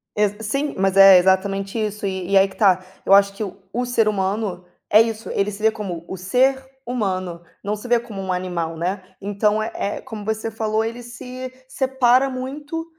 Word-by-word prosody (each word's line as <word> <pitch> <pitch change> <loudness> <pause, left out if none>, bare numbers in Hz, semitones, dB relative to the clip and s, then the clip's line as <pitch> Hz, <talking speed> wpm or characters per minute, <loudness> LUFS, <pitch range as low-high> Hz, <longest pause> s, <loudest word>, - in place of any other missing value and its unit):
Exa 210 +1 0
sim, 275 +7 -2
mas 195 0 +1
é 195 -1 +9
exatamente 195 +3 +1
isso 210 -1 -3
e 190 -2 -3
e 200 - +5
aí, 195 0 +6
que 190 - -15
tá, 190 -3 +3 0.2
eu - - +4
acho 200 0 +6
que 200 - -5
o 195 -2 -7 0.2
o 245 - 0
ser 235 -3 +2
humano 195 -2 -1 0.3
é 215 - +8
isso, 225 -1 -2
ele 200 +1 0
se 210 +1 -8
vê 220 - +5
como 185 -6 -6
o - - -5
ser 255 +9 +2 0.2
humano, 185 -8 -2 0.2
não 205 +1 -1
se 210 +4 -9
vê 240 -1 +3
como 225 -4 -8
um 190 -1 -3
animal, 175 -3 -3
né, 185 +4 -2 0.2
então 205 +2 0
é 220 - -4
é 200 - -3
como 220 -5 -8
você 220 +1 -3
falou 220 0 -1
ele 230 +2 -5
se 250 +2 -8 0.2
separa 265 0 +2
muito 290 +5 -5
210 Hz, 205 wpm, -21 LUFS, 195-240 Hz, 0.3 s, é